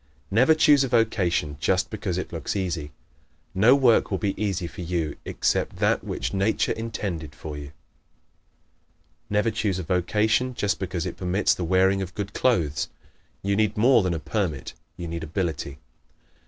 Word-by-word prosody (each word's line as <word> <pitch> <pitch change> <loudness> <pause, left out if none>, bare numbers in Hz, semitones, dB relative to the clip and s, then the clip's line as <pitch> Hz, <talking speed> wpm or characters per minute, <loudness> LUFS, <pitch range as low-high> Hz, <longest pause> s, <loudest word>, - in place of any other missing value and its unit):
Never 125 +10 +5
choose 145 -3 +5
a - - 0
vocation 100 - +1
just 95 +3 +1
because 100 -4 -3
it 95 - -5
looks 80 - -3
easy. 85 -6 -2 0.6
No 110 +8 +6
work 130 -5 +4
will 95 - 0
be 100 0 -1
easy 95 -4 -1
for 85 - -8
you 85 -3 -2
except - - 0
that - - +1
which - - -3
Nature 95 +3 +1
intended 95 -9 -4
for 75 0 -7
you. 75 0 -8 1.6
Never 105 +2 +2
choose 100 -5 -1
a 95 - -3
vocation 105 +9 +1
just 105 -3 0
because 90 -3 -3
it - - -5
permits 95 +2 +2
the 90 - -4
wearing 95 +3 +3
of 95 -2 -6
good 100 -1 -4
clothes. 75 - +1 0.5
You 100 +1 +1
need 105 0 +1
more 120 +2 +5
than 90 -3 0
a - - -3
permit; 85 - -3 0.2
you 85 - -5
need 85 0 -4
ability. 80 -4 -3
95 Hz, 165 wpm, -25 LUFS, 85-110 Hz, 1.6 s, No